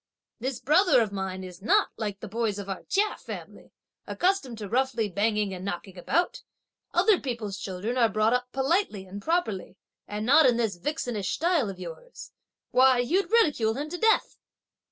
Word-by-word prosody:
This 255 +1 -3
brother 310 +3 +4
of 215 -3 -1
mine 190 -1 -4
is 180 0 -10
not, 220 - +3
like 205 -3 -4
the 220 - -6
boys 220 0 -1
of 200 -1 -6
our 195 -1 -4
Chia 415 +2 +1
family, - - -9 0.4
accustomed 360 - 0
to 210 -2 -6
roughly 245 -1 0
banging 210 +1 0
and 185 0 -7
knocking 190 0 -5
about. 335 - -1 0.5
Other 390 +2 +4
people's 225 -7 -4
children 205 +7 -3
are 230 -2 +4
brought 215 +2 +2
up 250 0 -1
politely 265 - 0
and 195 +2 -8
properly, 220 - -1 0.3
and 210 +1 -4
not 285 +4 +6
in 240 -2 +3
this 220 -6 -1
vixenish 225 - -3
style 330 - +1
of 195 - -7
yours. 180 - -10 0.4
Why, 260 0 +5
you'd 325 +12 +1
ridicule 295 - +3
him 290 +3 -4
to 355 - -3
death!" 445 0 +2
230 Hz, 175 wpm, -27 LUFS, 200-290 Hz, 0.5 s, not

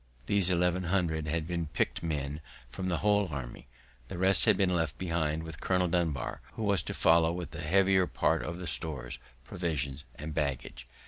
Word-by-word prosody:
These 95 +4 +3
eleven 90 0 +1
hundred 85 -4 0
had 80 0 -1
been 85 -1 -2
picked - - -1
men 75 -2 -3 0.3
from 95 +9 -3
the 85 - +1
whole 105 -1 +4
army; 65 -4 -7 0.4
the - - -6
rest 95 -1 +4
had - - +5
been 95 -2 +2
left 80 -3 -1
behind 80 -3 -1
with 80 -2 -8
Colonel 90 -1 +2
Dunbar, 80 -7 -1
who 110 - -5
was 100 -2 +3
to - - -5
follow 80 0 +4
with 90 0 -5
the 85 - -6
heavier 95 +3 +3
part - - +1
of 85 - -4
the 90 - -6
stores, 75 -5 -3 0.2
provisions, 70 -3 -3
and 75 +1 -6
baggage. 65 -4 -3
85 Hz, 185 wpm, -30 LUFS, 75-90 Hz, 0.4 s, had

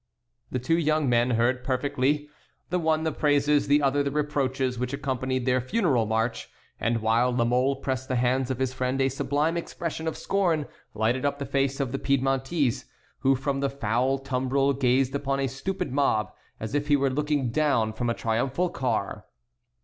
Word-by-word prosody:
The - - -2
two 145 +7 +1
young 155 -2 +1
men 120 0 +3
heard 125 +2 +1
perfectly, 140 +2 0 0.4
the 180 - +1
one 160 -1 +1
the 160 - 0
praises, 145 -1 +2
the 145 +1 +4
other 140 +1 +2
the 140 - 0
reproaches, 135 -4 -1
which 125 +2 -2
accompanied 130 -2 -2
their 130 -1 +2
funeral 130 - +1
march; 110 +2 -1 0.3
and 115 -1 0
while 115 +3 +3
La 120 -1 +1
Mole 125 +3 +2
pressed 130 -1 -3
the 130 - -1
hands 125 +1 +1
of 130 - -1
his 130 0 -1
friend 130 +1 -1
a 135 0 +3
sublime 145 +5 0
expression 165 -1 -4
of 160 - -2
scorn 175 -7 0 0.3
lighted 115 +4 0
up 140 0 0
the 140 - -4
face 135 0 0
of 135 -3 -1
the 135 - -2
Piedmontese, 135 -1 0 0.3
who 135 0 +3
from 135 +1 -2
the 140 0 0
foul 130 0 0
tumbril 135 +1 0
gazed 130 0 +2
upon 140 -1 -1
the 135 - 0
stupid 140 +4 -4
mob 135 -6 +1 0.3
as 110 +2 -5
if 145 0 0
he 145 - +4
were 135 -1 +1
looking 145 -3 0
down 125 -6 +1
from 120 +2 -2
a 115 - 0
triumphal 130 +10 0
car. 120 - -2
135 Hz, 185 wpm, -26 LUFS, 125-145 Hz, 0.4 s, the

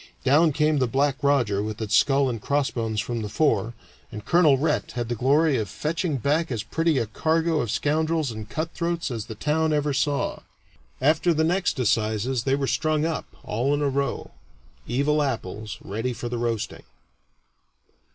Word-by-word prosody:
Down 150 +5 +4
came 150 0 +2
the 130 - +2
"Black 135 +3 +1
Roger" 125 -8 +2
with 110 0 -4
its 110 -2 0
skull 140 -1 +4
and 115 -4 -3
crossbones 115 -6 -1
from 115 +1 -2
the 105 - -4
fore, 120 -3 +1 0.4
and 105 0 -8
Colonel 160 -6 +5
Rhett 130 -7 -1
had 120 -1 -3
the 120 - -1
glory 140 +4 +3
of 105 -3 -3
fetching 155 - -2
back 150 +5 0
as 115 -3 -2
pretty 165 +4 0
a 115 - +1
cargo 160 +7 0
of 120 - -3
scoundrels 155 +3 0
and 110 -1 -8
cutthroats 170 +1 -2
as 115 -4 -4
the 110 - -7
town 155 +6 0
ever 145 -1 +1
saw. 140 +1 0 0.6
After 160 +5 +3
the 160 - +2
next 180 +1 +1
assizes 115 +1 0
they 135 0 +2
were 140 -1 -1
strung 155 +2 +1
up, 165 -1 -2 0.2
all 125 +7 0
in 145 - -1
a 140 - +2
row 140 +1 -2 0.6
evil 140 +5 +1
apples 110 -4 -3
ready 115 +5 -3
for 120 0 -5
the 120 0 -3
roasting. 115 -2 -2
135 Hz, 175 wpm, -25 LUFS, 115-155 Hz, 0.6 s, Colonel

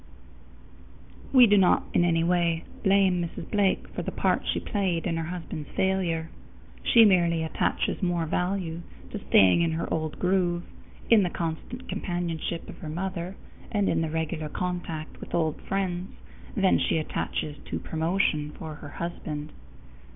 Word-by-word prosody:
We 255 -2 +9
do 205 -2 +5
not 185 - +4
in - - +4
any 165 -1 +2
way 170 -1 +2 0.2
blame 195 -3 +4
Mrs. 165 -1 -6
Blake 205 -3 +2
for - - -5
the - - -3
part - - +1
she - - +1
played 185 -5 -1
in 170 -3 0
her 165 0 -2
husband's 165 -4 -6
failure. 175 -4 0 0.5
She 230 -2 +6
merely 170 -4 +3
attaches 160 - -1
more 175 -3 +1
value 180 0 -1 0.3
to - - -6
staying 95 - +6
in 165 -1 +1
her 165 +1 -2
old 155 -1 -2
groove, 180 -2 +1 0.5
in 225 -2 +8
the 180 - +1
constant 170 +11 -5
companionship 170 -2 -3
of - - -10
her 155 - -6
mother, 180 +2 -4 0.4
and 205 -3 +1
in - - +2
the 160 - -1
regular 160 -1 -2
contact 175 -3 -4
with - - -5
old 160 -3 0
friends 185 -1 -2 0.4
than 195 -2 +4
she - - +1
attaches 150 -1 -3
to - - -3
promotion 160 -2 0
for 160 -1 -6
her 145 - -8
husband. 155 -2 -5
170 Hz, 155 wpm, -27 LUFS, 160-190 Hz, 0.5 s, We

